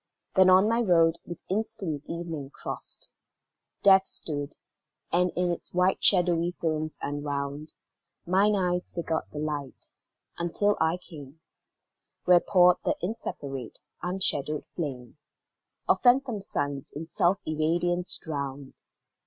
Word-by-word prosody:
Then 190 -1 +6
on 185 +3 +6
my 230 +1 +2
road, 170 -5 +3
with 175 - -8
instant 195 -7 -2
evening 165 -5 -5
crost, - - -7 0.7
Death 190 -1 +6
stood, 145 -2 -3 0.6
and 180 +1 +3
in 180 0 +1
its 170 - -5 0.3
shadowy 175 -3 +4
films 155 -2 -2
enwound, 145 +1 -4 0.5
Mine 195 +4 +3
eyes 180 -2 -1
forgot 165 -2 -2
the - - -10
light, 150 -3 -4 0.5
until 205 +4 +2
I 160 +2 +2
came 150 -4 -12 0.9
Where 180 -1 +7
poured 180 -1 +5
the - - +1
inseparate, 140 - -5 0.2
unshadowed 155 -5 0
flame 135 -5 -5 0.7
Of - - +3
phantom 245 -4 +3
suns 145 -7 -3
in 160 +2 -7
self 175 +3 +2
irradiance 175 +3 0
drowned. 140 -3 -5
170 Hz, 115 wpm, -27 LUFS, 145-185 Hz, 0.9 s, Where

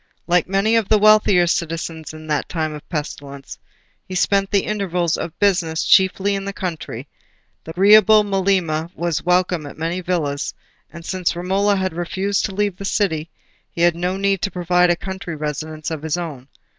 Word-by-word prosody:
Like 175 -1 +2
many 195 +4 +2
of 220 -4 0
the 215 - +5
wealthier 210 -4 +5
citizens 165 -1 -3
in 155 0 -11
that 150 -2 -2
time 155 -2 -2
of 150 0 -11
pestilence, 140 -3 -6 0.5
he 185 - -6
spent 195 +1 +2
the 200 -2 +2
intervals 180 -5 -1
of 165 - -6
business 175 -6 +1
chiefly 190 +1 +3
in 195 0 -2
the 200 0 -5
country: 180 -5 -5 0.6
the - - -12
agreeable 210 +4 +6
Melema 185 -5 0
was 170 -2 -1
welcome 180 -3 +1
at - - -11
many 165 +3 -2
villas, 160 -6 -2 0.4
and 170 0 -11
since 185 -2 -1
Romola 195 +4 +1
had 190 -3 -1
refused 190 +4 -1
to 195 - -5
leave 205 -2 -1
the 195 - -8
city, 170 -6 -1 0.4
he 170 - -6
had 175 -1 +4
no 180 +2 -2
need 195 -1 0
to - - 0
provide 180 0 +2
a 175 - +3
country 190 -2 -6
residence 155 +1 -5
of 160 -2 -4
his 160 +1 -2
own. 150 -7 -6
180 Hz, 180 wpm, -20 LUFS, 160-195 Hz, 0.6 s, agreeable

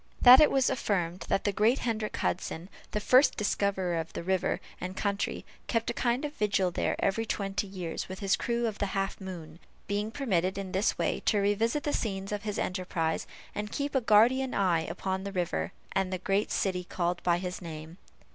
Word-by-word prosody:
That 250 +1 +10
it 305 - +7
was 270 -1 +2
affirmed 185 -8 -1
that - - +1
the 205 - +1
great 215 +6 +3
Hendrick 220 -3 -2
Hudson, 175 0 -2 0.2
the 210 - -2
first 255 +6 +5
discoverer 195 -4 0
of 160 - -5
the - - -5
river 190 0 0 0.2
and 185 +1 -5
country, 200 -1 -2 0.2
kept 230 -1 0
a - - -5
kind 245 +3 0
of 295 - -4
vigil 200 -6 +1
there - - 0
every 195 +3 +1
twenty 200 -2 -2
years, 180 -4 -5
with 190 - -6
his 195 0 +2
crew 235 -1 -1
of 215 -3 -3
the 200 - 0
Half 195 +1 -2
moon; 170 -4 -8 0.3
being 205 +1 -1
permitted 190 -8 0
in 195 -2 -4
this 190 +3 +1
way - - 0
to 210 - +4
revisit 215 +7 +1
the 295 - -1
scenes 195 -3 -2
of 205 -1 -2
his 210 -1 -3
enterprise, 180 -3 -1 0.3
and 210 0 -4
keep 285 0 -2
a 265 - +2
guardian 245 +4 +4
eye 180 -4 +2
upon 190 0 -3
the 200 - -4
river 165 - -1 0.2
and 195 -1 0
the 185 - -1
great 195 +3 0
city 185 -2 0
called 175 0 -2
by 175 -1 +2
his 180 +1 -5
name. 160 +1 -8
195 Hz, 200 wpm, -29 LUFS, 180-220 Hz, 0.3 s, That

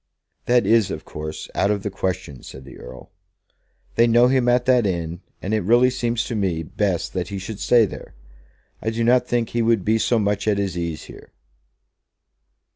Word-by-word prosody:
"That 120 0 +3
is, 115 -3 +3
of - - -6
course, 75 0 -7
out 100 - +1
of 100 -2 -1
the 105 - -3
question," 90 -9 -4
said 65 0 -11
the 70 - -12
Earl. 65 0 -12 0.8
"They 115 +1 +4
know 120 +2 +5
him 130 -2 +2
at 125 0 +2
that 125 -4 +3
inn, 85 -1 -3 0.2
and 100 - -2
it 110 - +1
really 120 +6 +4
seems 120 -2 -1
to 120 - -5
me 90 -6 -1
best 95 +1 -2
that 90 -2 -2
he 100 - -5
should 100 +2 -7
stay 120 -2 +4
there. 95 - -10 0.7
I 110 - -1
do 115 +1 -2
not 125 +2 +3
think 120 -2 0
he 120 - -1
would 115 -4 +1
be 110 +1 +2
so 120 - +2
much 105 -1 -1
at 105 -2 +2
his 100 -3 -2
ease 85 -3 -4
here." - - -13
105 Hz, 200 wpm, -22 LUFS, 90-120 Hz, 0.8 s, know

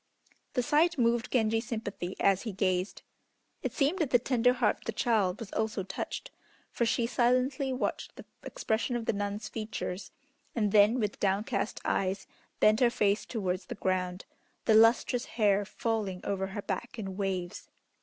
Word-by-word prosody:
The 250 - +1
sight 310 +5 +3
moved 235 -1 +1
Genji's 225 -1 +1
sympathy 205 -5 -4
as 195 -1 +3
he 225 - -4
gazed. 185 -1 -1 0.6
It - - -2
seemed 305 +7 +1
that 310 -6 +1
the 245 - +5
tender 245 0 +2
heart 245 -3 +1
of - - -20
the - - -1
child 215 -6 +1
was 220 -3 -8
also 220 -2 -1
touched, 190 +1 -5 0.4
for 235 - 0
she 230 +1 +1
silently 255 +3 +1
watched 255 - -3
the - - -11 0.2
expression 225 +3 -2
of 235 -2 -2
the - - +1
nun's 205 +1 -3
features, 215 -3 -5 0.5
and 210 -4 +1
then 210 +4 +5
with 210 -3 -2
downcast 200 +2 -1
eyes 190 0 0 0.3
bent 215 +1 +5
her 245 - +5
face 205 -3 +1
towards 185 -5 -2
the - - -5
ground, 185 -2 -1 0.4
the 220 - +4
lustrous 225 +2 +4
hair 205 -2 +3
falling 210 -4 -2
over 195 -1 -1
her 200 +1 -6
back 240 +1 -4
in 195 -4 -5
waves. 185 -3 -3
220 Hz, 165 wpm, -30 LUFS, 195-240 Hz, 0.6 s, the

